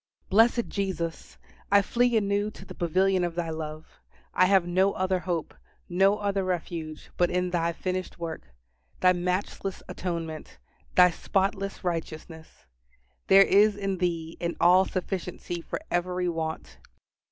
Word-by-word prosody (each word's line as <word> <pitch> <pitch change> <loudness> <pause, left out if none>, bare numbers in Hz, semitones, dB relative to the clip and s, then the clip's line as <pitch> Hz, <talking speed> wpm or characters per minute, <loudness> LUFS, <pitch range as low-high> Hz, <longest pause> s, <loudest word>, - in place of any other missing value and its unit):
Blessed 230 +3 +4
Jesus! 185 -5 -4 0.3
I 200 0 +6
flee 240 +2 +2
anew 205 0 0
to - - -13
the - - -9
pavilion 185 +2 +1
of 175 -1 -2
Thy 170 -2 -2
love. 155 0 -7 0.3
I 185 - +4
have 190 -2 +4
no 185 +3 +2
other 185 0 0
hope, 175 -2 -3 0.3
no 195 +3 +3
other 200 -2 -1
refuge, 165 -3 -4
but 175 - +3
in 180 0 -1
Thy 170 -1 +1
finished 185 +2 -4
work 165 -2 -6 0.5
Thy 185 0 +6
matchless 180 +2 -3
atonement 165 -3 -5 0.4
Thy 180 -1 +7
spotless 195 +3 -2
righteousness. 160 -2 -6 0.6
There 195 0 +8
is 205 +2 +4
in 195 -2 -3
Thee 165 -2 -2
an 170 0 -2
all 180 +2 +6
sufficiency 180 -2 -4
for - - -5
every 180 +1 0
want. 160 -2 -4
180 Hz, 140 wpm, -27 LUFS, 170-195 Hz, 0.6 s, There